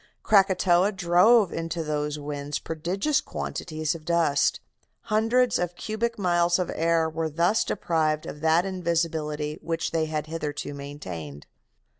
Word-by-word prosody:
Krakatoa 190 -2 +4
drove 190 +3 +4
into 165 0 -3
those 150 -1 -2
winds 145 0 -4
prodigious 185 - -1
quantities 155 -2 -3
of 165 -2 -9
dust. 165 -4 +2 0.5
Hundreds 230 +3 +3
of 175 0 -2
cubic 225 +5 -3
miles 175 -3 +2
of 180 - -2
air 165 0 +2
were 160 0 -2
thus 170 +8 +2
deprived 155 -5 0
of 150 - -8
that 160 +3 +3
invisibility 160 -5 -2
which 165 -1 -2
they 160 -1 0
had 155 -1 -3
hitherto 150 -2 -4
maintained. 90 - -8
165 Hz, 130 wpm, -26 LUFS, 150-180 Hz, 0.5 s, Krakatoa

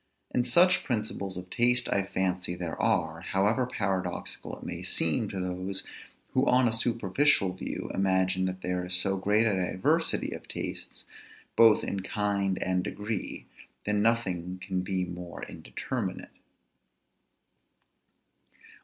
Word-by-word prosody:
And 125 0 +1
such 175 +9 +5
principles 105 -6 -2
of 90 0 -8
taste 125 0 +3
I 100 - +2
fancy 95 -2 -1
there 85 -2 -4
are; 80 0 +1
however 105 +8 +1
paradoxical 100 -6 -3
it - - -13
may - - -5
seem 80 +6 +2
to 95 - -4
those, 95 +1 -1 0.5
who 130 - +3
on 125 0 +5
a 115 - +1
superficial 115 -2 +2
view 95 - -5
imagine 95 -1 +2
that 95 0 -4
there 90 0 -1
is 90 0 -1
so 95 +2 +2
great 105 +3 +2
a 110 - +3
diversity 95 0 +1
of - - -8
tastes, - - -5 0.5
both 115 -2 +6
in 100 - -2
kind 100 -1 0
and 90 -1 0
degree, 105 +1 -4 0.4
that 105 - 0
nothing 100 -5 +1
can 95 -2 0
be 95 0 -1
more 90 -1 -7
indeterminate. - - -5
95 Hz, 135 wpm, -29 LUFS, 90-110 Hz, 0.5 s, both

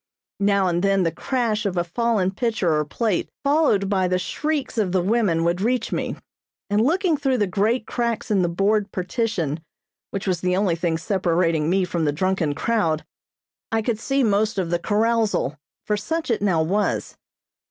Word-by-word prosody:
Now 200 -1 +3
and 175 -1 +1
then 195 -1 +2
the 165 - +1
crash 225 - -1
of 195 -3 -2
a 175 - +2
fallen 200 +1 0
pitcher 215 -5 0
or 150 0 +2
plate, 210 +4 -1
followed 280 -9 +3
by 190 -2 +1
the 180 0 +1
shrieks 280 - -2
of 190 -4 0
the 185 - +3
women 195 -5 +2
would 170 +2 0
reach 245 +4 0
me, - - -2 0.6
and 205 +1 +3
looking 340 - +2
through 270 -2 +1
the 210 - +2
great 210 +5 0
cracks 235 -3 -2
in 200 -3 +3
the 175 - +1
board 200 +3 +1
partition 185 - -2 0.5
which 195 - -4
was 180 -3 0
the 180 0 +1
only 190 -4 +2
thing 165 -1 -1
separating 170 -4 +1
me 190 +1 +2
from 170 -2 -1
the 145 - +2
drunken 170 -2 0
crowd, 165 -9 0 0.7
I 225 0 +1
could 220 -1 -1
see 270 +3 +1
most 215 0 +1
of 180 -3 -1
the 175 - +1
carousal, 215 - +1 0.3
for 210 - +1
such 320 +8 -2
it 225 - 0
now 180 -6 +2
was. 200 +6 -1
200 Hz, 185 wpm, -23 LUFS, 175-225 Hz, 0.7 s, Now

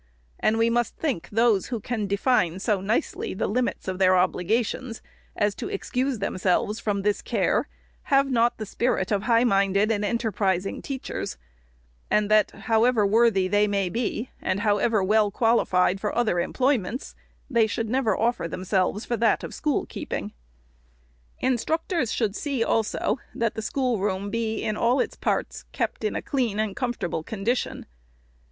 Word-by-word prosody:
And 220 - +2
we 230 +1 +3
must 240 -1 0
think 275 - -2
those 225 -2 +2
who 240 -2 -3
can 215 -1 -3
define 200 -4 +1
so 195 0 0
nicely 205 -1 -1
the - - -1
limits 245 0 -1
of 185 0 -3
their 185 -1 +5
obligations, 220 +6 0 0.4
as 205 0 +1
to - - -6
excuse 255 +5 -1
them 200 -2 -3
selves 200 +4 +1
from 200 -3 -1
this 205 0 +1
care, - - 0 0.4
have 275 0 +3
not 240 -1 +2
the 215 - -5
spirit 220 -2 -1
of 200 -2 +2
high 230 +2 +3
minded 200 -1 +2
and 210 -2 0
enterprising 200 -4 -1
teachers, 265 - -5 0.7
and 210 0 +2
that, 215 0 +5
however 225 -1 +2
worthy 210 -2 +3
they 205 +2 +3
may 200 -2 0
be, 235 +3 -3
and 195 - -1
however 210 0 +2
well 210 +2 +3
qualified 195 -4 +2
for 210 - -2
other 220 -7 +2
employ 260 +8 +2
ments, 215 +7 -6 0.3
they 235 -5 +3
should 225 +1 -2
never 230 -3 +1
offer 235 -6 0
themselves 185 +4 -1
for 240 - -1
that 225 0 +2
of - - -6
school 300 -2 -1
keeping. - - -5 0.6
" - - -36
Instructors 315 - 0
should 215 -4 0
see, 275 -4 -1
also, 225 +2 0 0.2
that 230 -2 0
the 220 - -4
schoolroom 205 -6 -1
be, 225 -1 -2
in 215 - -1
all 240 +4 +2
its - - -1
parts, - - -2
kept - - -3
in 430 - -1
a - - -3
clean 240 -7 -1
and 215 -2 -1
comfortable 240 -10 -2
condition. 220 +8 -2
215 Hz, 165 wpm, -25 LUFS, 195-240 Hz, 0.7 s, their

